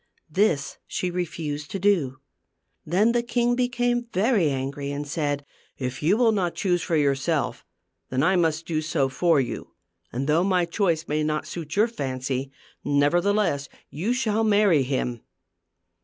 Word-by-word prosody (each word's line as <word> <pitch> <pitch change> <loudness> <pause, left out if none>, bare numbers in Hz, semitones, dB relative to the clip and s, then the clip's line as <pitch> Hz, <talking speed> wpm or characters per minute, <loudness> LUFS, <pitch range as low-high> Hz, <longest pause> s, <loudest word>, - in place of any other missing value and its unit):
This 160 -6 +1
she 180 - -2
refused 155 -4 -4
to - - -3
do. 170 -10 +2 0.7
Then 200 +8 +3
the 240 0 +2
king 240 0 +1
became 245 -1 0
very 200 - +2
angry 140 +1 -3
and 145 +1 -4
said, 145 -2 -2 0.2
" - - -37
If 125 +1 -6
you 175 +8 +3
will 235 -2 +4
not 185 -5 0
choose 175 -3 +1
for 165 - -1
yourself, 140 -2 0 0.5
then 130 +2 0
I 190 +3 +4
must 165 -2 +1
do 155 -2 -1
so 155 -4 0
for 165 +3 +3
you; 130 - -4 0.4
and 130 +3 -2
though 160 +3 +3
my 185 -2 +2
choice 170 -2 0
may 150 +1 0
not 155 0 -1
suit 160 -3 -6
your 215 +3 +4
fancy, 135 - -3 0.3
nevertheless 160 +1 +2 0.2
you 180 +11 -2
shall 225 -3 +1
marry 205 -7 +4
him." 125 -3 -2
165 Hz, 155 wpm, -25 LUFS, 140-205 Hz, 0.7 s, will